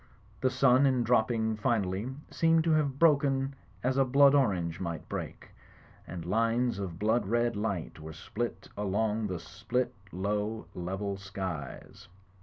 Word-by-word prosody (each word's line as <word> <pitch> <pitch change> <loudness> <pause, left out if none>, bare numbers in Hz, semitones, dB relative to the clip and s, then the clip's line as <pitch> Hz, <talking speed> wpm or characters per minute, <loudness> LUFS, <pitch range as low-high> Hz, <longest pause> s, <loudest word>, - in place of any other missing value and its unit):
The 130 - +2
sun, 130 +1 +4
in 130 -2 +2
dropping 110 -1 +2
finally, 105 -2 0 0.2
seemed 165 -1 +3
to 165 - +2
have 145 -4 +2
broken 140 -3 +3 0.3
as 130 +2 +1
a 135 - +5
blood 140 +2 +5
orange 90 - +1
might 85 -3 -4
break; - - -6 0.6
and 85 -2 -6
lines 115 +3 +1
of 90 -4 -5
blood 110 +2 +1
red 120 +1 +1
light 100 -7 -3
were 80 +1 -8
spilt 115 +8 -5
along 105 +2 0
the 90 -2 -3
split, 115 +7 -2 0.2
low, 105 +4 -2
level 95 +3 -3
skies. 95 -6 -6
110 Hz, 140 wpm, -30 LUFS, 95-130 Hz, 0.6 s, a